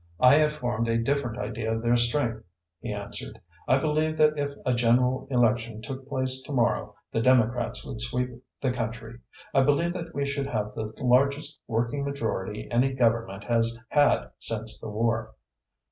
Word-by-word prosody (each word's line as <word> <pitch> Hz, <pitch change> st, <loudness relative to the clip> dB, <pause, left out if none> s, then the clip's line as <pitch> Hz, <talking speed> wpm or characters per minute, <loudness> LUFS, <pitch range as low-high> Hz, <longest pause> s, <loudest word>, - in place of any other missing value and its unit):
"I 125 Hz, +1 st, +7 dB
have 150 Hz, -1 st, +3 dB
formed 120 Hz, -5 st, -2 dB
a 115 Hz, 0 st, +2 dB
different 120 Hz, -1 st, -1 dB
idea 110 Hz, -1 st, -3 dB
of 115 Hz, 0 st, -2 dB
their 120 Hz, +1 st, +3 dB
strength," 120 Hz, -1 st, +1 dB, 0.4 s
he -, -, -5 dB
answered. -, -, -5 dB, 0.3 s
"I 130 Hz, -, +5 dB
believe 155 Hz, +2 st, 0 dB
that 155 Hz, 0 st, +4 dB
if 145 Hz, -1 st, -1 dB, 0.2 s
a 125 Hz, -, +2 dB
general 125 Hz, +2 st, +2 dB
election 115 Hz, -3 st, +1 dB
took 130 Hz, +4 st, -7 dB
place 130 Hz, -1 st, 0 dB
to 130 Hz, -, -9 dB
morrow, 120 Hz, -3 st, 0 dB, 0.2 s
the 115 Hz, -, 0 dB
Democrats 120 Hz, -1 st, +2 dB
would 110 Hz, -, -5 dB
sweep 125 Hz, +2 st, 0 dB, 0.3 s
the 130 Hz, -, +1 dB
country. 115 Hz, -1 st, -5 dB, 0.3 s
I 135 Hz, -, +5 dB
believe 145 Hz, +6 st, +2 dB
that 170 Hz, -1 st, -6 dB
we 140 Hz, -, 0 dB
should 140 Hz, 0 st, -2 dB
have 105 Hz, -5 st, -2 dB
the 110 Hz, -1 st, -4 dB
largest 140 Hz, +4 st, +2 dB
working 120 Hz, +4 st, -1 dB
majority 110 Hz, -7 st, -3 dB
any 125 Hz, +3 st, +2 dB
Government 115 Hz, -6 st, +1 dB
has 115 Hz, -1 st, +1 dB
had 145 Hz, -1 st, +3 dB
since 110 Hz, 0 st, -3 dB
the -, -, -7 dB
war." 110 Hz, +1 st, -1 dB
120 Hz, 170 wpm, -27 LUFS, 115-140 Hz, 0.4 s, I